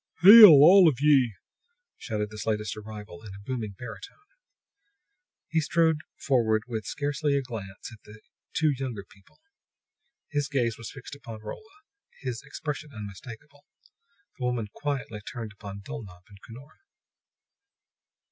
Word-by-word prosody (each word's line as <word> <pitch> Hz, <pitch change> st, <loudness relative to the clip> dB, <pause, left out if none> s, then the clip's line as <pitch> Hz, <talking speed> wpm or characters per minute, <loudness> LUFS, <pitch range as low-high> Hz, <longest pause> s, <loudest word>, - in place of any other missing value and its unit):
"Hail, 210 Hz, +3 st, +12 dB
all 170 Hz, +5 st, +8 dB
of 130 Hz, -, -4 dB
ye!" 135 Hz, -7 st, +3 dB, 0.6 s
shouted 105 Hz, -1 st, -4 dB
this 110 Hz, 0 st, -8 dB
latest 105 Hz, -1 st, -2 dB
arrival 105 Hz, -4 st, -10 dB
in 105 Hz, -3 st, -10 dB
a -, -, -11 dB
booming 110 Hz, -2 st, -5 dB
baritone. 125 Hz, -, -10 dB, 1.3 s
He 165 Hz, -, 0 dB
strode 160 Hz, 0 st, +1 dB, 0.2 s
forward 110 Hz, -5 st, +1 dB
with 110 Hz, -4 st, -5 dB
scarcely 145 Hz, 0 st, -1 dB
a 140 Hz, -, 0 dB
glance 105 Hz, -4 st, -8 dB
at 110 Hz, -, -14 dB
the 105 Hz, +1 st, -14 dB, 0.3 s
two 155 Hz, -1 st, +2 dB
younger 130 Hz, -6 st, -5 dB
people; 100 Hz, 0 st, -24 dB, 0.9 s
his 145 Hz, -2 st, -2 dB
gaze 120 Hz, -5 st, 0 dB
was 115 Hz, 0 st, -9 dB
fixed 135 Hz, 0 st, -11 dB
upon 115 Hz, -6 st, -10 dB
Rolla, 420 Hz, -, -10 dB, 0.4 s
his 125 Hz, -4 st, -5 dB
expression 150 Hz, +1 st, -6 dB
unmistakable. 110 Hz, +6 st, -11 dB, 0.7 s
The 125 Hz, -, -3 dB
woman 120 Hz, -4 st, -2 dB
quietly 140 Hz, -7 st, -4 dB
turned 115 Hz, 0 st, -7 dB
upon 100 Hz, -1 st, -9 dB
Dulnop 95 Hz, -3 st, -10 dB
and 100 Hz, -2 st, -17 dB
Cunora. 130 Hz, +6 st, -14 dB
120 Hz, 135 wpm, -27 LUFS, 105-145 Hz, 1.3 s, Hail